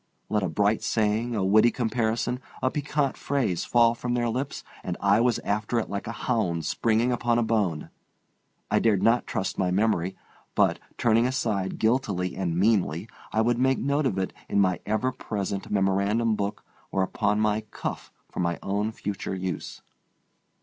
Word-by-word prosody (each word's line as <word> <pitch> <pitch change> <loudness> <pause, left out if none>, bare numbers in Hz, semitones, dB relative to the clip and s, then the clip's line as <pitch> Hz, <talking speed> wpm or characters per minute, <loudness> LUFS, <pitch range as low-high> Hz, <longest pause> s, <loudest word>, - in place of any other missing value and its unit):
Let 105 -1 +1
a 95 - -1
bright 105 +6 +2
saying, 110 +2 0
a 100 -3 0
witty 110 +4 +6
comparison, 120 0 -1 0.2
a 130 - +2
piquant 145 -1 -1
phrase 125 -12 -1
fall 120 -1 +4
from 120 +1 -2
their 120 -1 +1
lips 130 +4 -3 0.2
and 90 - -3
I 100 +2 +4
was 120 -1 +3
after 105 +3 0
it 115 - -1
like 100 +1 -4
a - - -2
hound 90 -10 0
springing 115 +2 +1
upon 120 -1 +1
a 120 - +3
bone. 105 -9 0 0.8
I - - +4
dared 105 -4 +2
not 115 +2 +3
trust 95 - -2
my 90 - +2
memory; 95 -2 +1 0.4
but, - - +3 0.2
turning 115 +1 +3
aside 105 -7 -1
guiltily 105 -6 0
and 85 -3 -1
meanly, 95 -2 +1 0.2
I 110 - +2
would 120 +1 +2
make 130 +1 +3
a - - -5
note 140 +1 +1
of 95 - -2
it 95 -1 -1 0.2
in - - +2
my 95 -3 +3
ever 110 +5 +1
present 100 -5 -4
memorandum 100 +3 +2
book 100 0 -3 0.3
or 95 - +1
upon 105 +2 0
my 105 0 +2
cuff - - -5 0.2
for - - -8
my 85 -1 0
own 105 +3 -1
future 100 -3 -4
use. 95 -3 -5
110 Hz, 175 wpm, -26 LUFS, 95-120 Hz, 0.8 s, witty